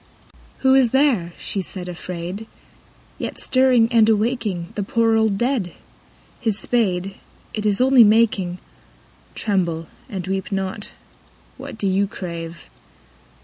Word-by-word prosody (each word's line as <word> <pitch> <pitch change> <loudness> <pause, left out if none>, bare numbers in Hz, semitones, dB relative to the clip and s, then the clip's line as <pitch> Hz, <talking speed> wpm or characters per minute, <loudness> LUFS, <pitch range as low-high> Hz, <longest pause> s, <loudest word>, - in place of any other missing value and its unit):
II. - - -26 0.2
Who 265 0 +5
is 265 -3 +5
there, 245 -11 +2
she 195 - -3
said 180 0 -6
afraid, 180 +4 -6 0.7
yet - - -4
Stirring 255 -3 +4
and 225 -2 +5
awaking 215 -5 0
The 210 - -3
poor 225 +2 +2
old 220 -3 +2
dead? 240 -7 -1 0.7
His 220 -4 0
spade, 195 -6 0 0.4
it 215 -1 -1
Is 205 -1 +1
only 260 -1 +7
making, 210 -5 +3 0.4
— - - -31
(Tremble 170 -6 -1 0.2
and 190 -4 -5
weep 190 +1 -3
not 195 +1 -3
I - - -16 0.7
What - - -8
do 205 - -3
you 195 +1 +2
crave 170 -3 -7
205 Hz, 140 wpm, -21 LUFS, 180-230 Hz, 0.7 s, only